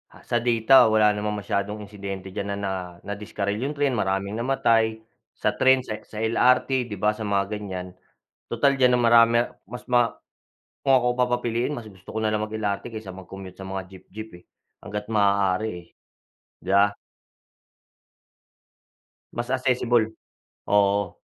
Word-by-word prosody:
ah, - - -17
sa 120 - 0
data 120 +2 +5
wala 110 -1 +5
namang 105 0 -2
masiyadong 100 +3 -2
insidente 100 -2 -7
diyan 100 +1 -3
na - - -6
na, 100 -1 -2
ah, 90 -2 -5
nadiskarel. 100 0 -3
'Yong 140 +4 -3
tren 145 -1 +1
maraming 100 +1 -1
namatay 115 -3 +1 0.3
sa - - 0
tren, 130 0 +5
sa 110 -3 -5
X - - -17
sa - - -4
LRT, 125 +2 +2
'di 105 - -5
ba, 105 +2 +3
sa 110 +1 -6
mga 100 +1 0
ganiyan. 90 -3 -6 0.6
Total 140 - +2
diyan 125 -1 +5
ang - - +1
marami 115 0 +6 0.3
mas 120 +4 -8
ma 120 -1 +4 0.8
kung 135 - +6
ako 125 0 +1
papapiliin 120 +1 0
mas 120 -4 -7
gusto 95 -1 -14
ko - - -1
na 110 - +1
lang 105 0 0
mag-LRT 105 +1 -3
kaysa 110 -3 -7
mag-commute 95 0 -10
sa 95 - -7
mga 95 0 -3
jeep-jeep 95 +4 -10
eh. - - -43 0.4
Hangga't 105 0 -6
maaari 100 -1 +2 0.7
eh,'di 90 - -14
ba? 100 +1 +4 2.4
Mas 120 +1 -4
accessible, 125 -4 +1 0.5
oo. 100 -1 +2
105 Hz, 155 wpm, -24 LUFS, 100-120 Hz, 2.4 s, marami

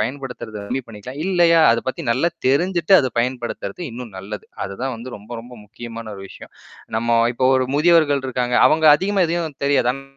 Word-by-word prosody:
பயன்படுத்துறது 125 -2 -5
கம்மி 125 +6 -3
பண்ணிக்கலாம். 115 +5 -10
இல்லையா, 175 -3 +4
அத 115 - 0
பத்தி 165 - -4
நல்லா 135 +9 +2 0.2
தெரிஞ்சுட்டு 175 +7 +2
அத 130 - -1
பயன்படுத்துறது 125 +7 -3
இன்னும் 115 -4 -9
நல்லது. 105 +2 -8 0.2
அதுதான் 120 +7 -4
வந்து 120 +2 -8
ரொம்ப 105 +4 -13
ரொம்ப 125 +2 -14
முக்கியமான 115 0 -8
ஒரு 95 - -9
விஷயம் - - -13 0.4
நம்ம 115 +1 +1 0.2
இப்போ 130 +1 +1
ஒரு 130 -1 0
முதியவர்கள் 150 -4 +3
இருக்காங்க 125 -1 -1
அவங்க 160 0 +2
அதிகமா 195 +1 +1
எதையும் 165 -3 -3
தெரியாது. 135 -3 +3
ஆன் 135 +1 -8
130 Hz, 170 wpm, -20 LUFS, 115-155 Hz, 0.4 s, இல்லையா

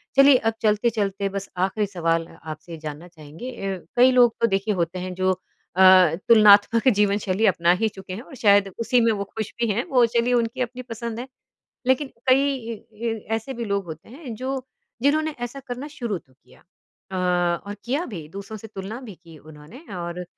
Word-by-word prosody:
चलिए 275 0 +8
अब - - -4
चलते-चलते 210 -2 +1
बस 195 0 -5 0.2
आखिरी 210 +2 -1
सवाल 165 -3 0
अ 165 - -16
आपसे 165 +2 -9
जानना 155 +3 -7
चाहेंगे 165 - -10 0.2
अ, - - -9 0.2
कई 250 +2 +6
लोग 245 -2 +5
तो 230 - +5
देखिए 200 +1 0
होते 175 0 -2
हैं 185 0 -5
जो 185 +1 +1
अ, 185 -1 +4
तुलनात्मक 215 +2 +6
जीवन-शैली 205 0 +1
अपना 170 -2 +3
ही 225 - +3
चुके 190 -2 -9
हैं 210 - -6
और 275 +1 -13
शायद 200 -3 +4
उसी 240 +2 +2
में 230 0 +3
वो 200 -2 -2
खुश 220 - -3
भी 235 - +1
हैं। 235 +5 0
वो 250 -3 +5
चलिए 235 +1 +2
उनकी 235 +1 0
अपनी 250 +1 -3
पसंद 230 -1 -6
है। 250 - -6 0.6
लेकिन 260 +2 +2 0.2
कई 275 +2 +4
इ 230 -3 -5 0.3
इ 225 - -2 0.2
ऐसे 225 +4 -4
भी 235 -1 -4
लोग 200 -2 -1
होते 160 +3 -9
हैं, 255 -2 -8
जो 260 +2 -4 0.4
जिन्होंने 310 +2 +2
ऐसा 260 +3 -7
करना 250 +2 -6
शुरू 235 -8 -3
तो 135 -5 -26
किया। 130 - -23 0.5
अ, 190 - -4 0.5
और 205 - -5
किया 275 +8 -1
भी 160 -5 -6
दूसरों 200 +5 -8
से 225 - -10
तुलना 205 +3 -7
भी 230 -7 -10
की 165 -2 -16
उन्होंने 150 - -13
और 175 0 -5
210 Hz, 195 wpm, -23 LUFS, 185-245 Hz, 0.6 s, चलिए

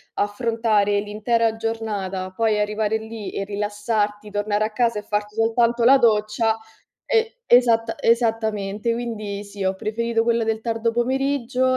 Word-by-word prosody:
affrontare 205 -1 +1
l'intera 220 +2 0
giornata, 205 -5 -3
poi 215 +1 +1
arrivare 210 +1 0
lì 220 -1 -7
e 195 - -3
rilassarti, 210 0 -2
tornare 205 +1 0
a 220 - -4
casa 235 -1 +1
e - - -9
farti 210 0 -3
soltanto 235 +1 +2
la 265 +3 +7
doccia, 220 0 +2 0.5
e 460 +1 0
esatta 230 -2 +4
esattamente. 220 -2 +1
Quindi 215 -4 -4
sì, 200 -1 -6
ho 190 0 +1
preferito 225 +3 -1
quella 235 -1 +2
del 220 0 -1
tardo 230 0 -1
pomeriggio 255 +1 0
220 Hz, 140 wpm, -22 LUFS, 210-235 Hz, 0.5 s, la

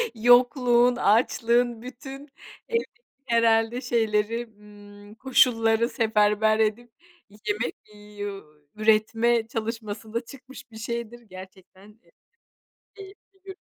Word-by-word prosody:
yokluğun, 245 +1 +4
açlığın, 235 +1 +1
bütün, 270 +3 -10 0.4
evet, 465 -1 -1 0.4
herhâlde 230 0 +2
şeyleri, 230 -1 -1
ımm, 205 0 -15
koşulları 230 -2 +2
seferber 215 -2 +1
edip, 220 +2 -1 0.5
yemek 210 +3 -2 0.4
yu 200 -1 -5 0.3
üretme 225 +2 +2
çalışmasında 225 0 -5
çıkmış 260 -1 -14
bir 220 - -12
şeydir. 235 +1 -6
Gerçekten, 190 +1 -15
e, - - -28 0.9
keyifli 390 -1 -16
bir. 385 -1 -9
230 Hz, 90 wpm, -25 LUFS, 215-245 Hz, 0.9 s, yokluğun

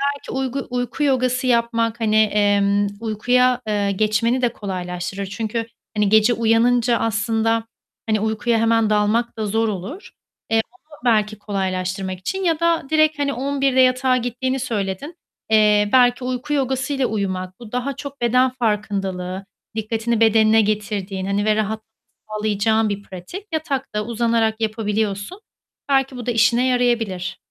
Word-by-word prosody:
belki 285 - -10
uygu 265 0 -3
uyku 250 +4 -2
yogası 255 -2 +1
yapmak 235 -1 +1
hani, 215 -1 +1
emm, 205 -1 +3
uykuya, 245 +3 +2
eee, 205 -1 0
geçmeni 220 +5 +1
de 240 -2 +1
kolaylaştırır 185 0 -4
çünkü 220 +3 -3 0.3
hani 210 -1 +2
gece 220 +2 +5
uyanınca 235 +1 +3
aslında 225 +1 0 0.4
hani 215 - +2
uykuya 220 +2 0
hemen 225 -1 +2
dalmak 215 +3 +1
da 220 - -2
zor 225 +2 +1
olur. 215 - -6 0.4
Eee, 225 0 +4
onu 310 -5 -19
belki 215 -2 +2
kolaylaştırmak 190 -2 -3
için 380 - -3
ya 330 -3 +1
da 335 0 +2
direkt 310 -1 +3
hani 280 -1 0
11.00'de 275 0 0
yatağa 255 0 +4
gittiğini 250 +2 -2
söyledin. 220 - -3 0.4
Eee, 210 -1 +4
belki 245 0 +4
uyku 255 +3 -3
yogasıyla 265 -1 0
uyumak, 185 -3 -3
bu 230 -3 -11
daha 250 +2 -2
çok 280 -2 -8
beden 250 +2 +3
farkındalığı, 195 -6 -2 0.3
dikkatini 225 +1 -1
bedenine 220 0 +5
getirdiğin 205 -2 -2
hani, 200 +1 0
ve 215 - +3
rahatlık 215 0 -2 0.4
sağlayacağın 215 +1 +1
bir 200 0 -3
pratik. 195 - -9
Yatakta 275 -9 -2
uzanarak 230 -1 0
yapabiliyorsun. 215 - -2 0.5
Belki 270 -1 +2
bu 245 - -7
da 245 - 0
işine 235 +2 +3
yarayabilir. 235 -7 0
225 Hz, 140 wpm, -21 LUFS, 210-250 Hz, 0.5 s, gece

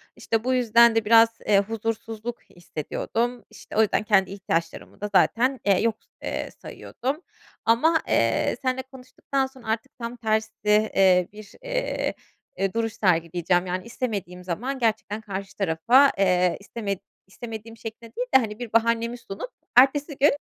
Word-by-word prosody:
İşte, 225 -1 -1
bu 255 +1 +1
yüzden 235 -2 +5
de 225 -1 +1
biraz, 225 +1 +7 0.2
eee, 200 -2 +5
huzursuzluk 225 +2 -4
hissediyordum. 225 +8 -4
İşte, - - -12
o - - +6
yüzden 215 -1 +2
kendi 195 -3 +3
ihtiyaçlarımı 170 -4 -3
da 210 - -3
zaten, 255 +6 +3
eee, 195 -2 +4
yok, 225 -1 +1 0.3
eee, - - -3
sayıyordum 270 +7 -5 0.4
ama, 315 +9 +4
eee, - - +2
seninle 260 -1 0
konuştuktan 265 +1 -4
sonra 260 -3 -16
artık 225 +5 -2
tam 235 0 -5
tersi, 220 -1 0 0.2
eee, 195 -4 +4
bir, 210 -1 -12
eee, - - -2 0.4
eee, 195 -1 -1
duruş 225 -1 -1
sergileyeceğim. 175 -1 +1
Yani, 185 0 -3
istemediğim 200 -7 -4
zaman 240 +10 -3
gerçekten 220 -2 -1
karşı 195 -2 -6
tarafa, 210 +10 +4
eee, 180 -2 +2
isteme 200 -1 -4 0.3
istemediğim 225 +2 -9
şeklinde 225 +1 -9
değil - - -2
de, - - +12
hani, 215 -3 -4
bir 240 -3 -7
bahanemi 230 +1 +2
sunup 230 - -7 0.3
ertesi 285 +3 +4
gün, 290 +3 +5
225 Hz, 150 wpm, -25 LUFS, 195-245 Hz, 0.4 s, de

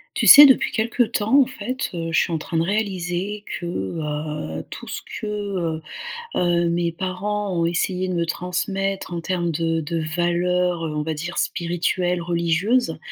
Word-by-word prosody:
Tu - - +1
sais 290 - +12
depuis 265 -2 +4
quelque 230 +2 0
temps, 230 +3 +3
en 260 - +2
fait, 255 +1 -4
heu, 165 -1 -3
je - - +3
suis - - 0
en 165 - 0
train 160 +1 -4
de - - +3
réaliser 195 0 -2 0.2
que, 175 - -6
heu, 150 - -4
tout - - -9
ce - - -5 0.2
que, - - -5
heu, 195 -6 -3 0.5
heu, 175 -1 +2
mes 170 0 0
parents 190 +3 -3
ont 170 -1 +1
essayé 180 +2 -1
de 185 - -2
me 170 -1 0
transmettre 190 +2 -2
en 170 - -3
termes 175 -1 -1
de 165 +1 0
de 165 +2 -3 0.2
valeurs, 175 0 +1
on 150 -2 -2
va 160 - -2
dire, 165 +3 -5
spirituelles, 175 +1 0
religieuses. 170 +5 +1
175 Hz, 175 wpm, -22 LUFS, 165-195 Hz, 0.5 s, sais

